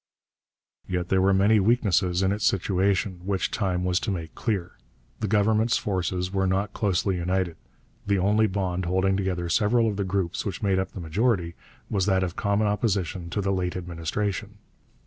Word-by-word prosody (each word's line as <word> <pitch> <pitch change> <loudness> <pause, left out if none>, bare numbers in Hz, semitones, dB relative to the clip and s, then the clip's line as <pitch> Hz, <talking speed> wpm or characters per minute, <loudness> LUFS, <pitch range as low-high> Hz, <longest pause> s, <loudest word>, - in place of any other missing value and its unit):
Yet 90 -1 -2
there 95 -1 +3
were 95 +1 +4
many 100 +3 +4
weaknesses 95 -4 +2
in 95 - +2
its 100 0 -2
situation, 95 0 +1
which 95 0 -1
time 90 -4 -1
was 90 0 +2
to 110 - -3
make 85 -5 -4
clear. 95 -6 -2 0.5
The 110 - -1
Government's 110 +3 +2
forces 90 -1 -2
were 95 -1 +1
not 95 +2 0
closely 95 -1 0
united: 90 -1 -1 0.5
the 100 -1 +2
only 105 +4 +3
bond 95 -2 -2
holding 95 +2 +1
together 95 -3 -1
several 110 +6 +2
of 105 -2 -2
the 100 - 0
groups 95 -2 -1
which 100 +1 -5
made 95 -2 +2
up 95 - -3
the - - -7
majority 85 +1 0 0.3
was 100 -2 0
that 95 -2 +3
of 90 0 -3
common 100 0 +1
opposition 95 -4 -1
to 100 - -2
the 100 0 0
late 90 -1 -1
administration. 100 +5 -3
95 Hz, 175 wpm, -26 LUFS, 90-105 Hz, 0.5 s, were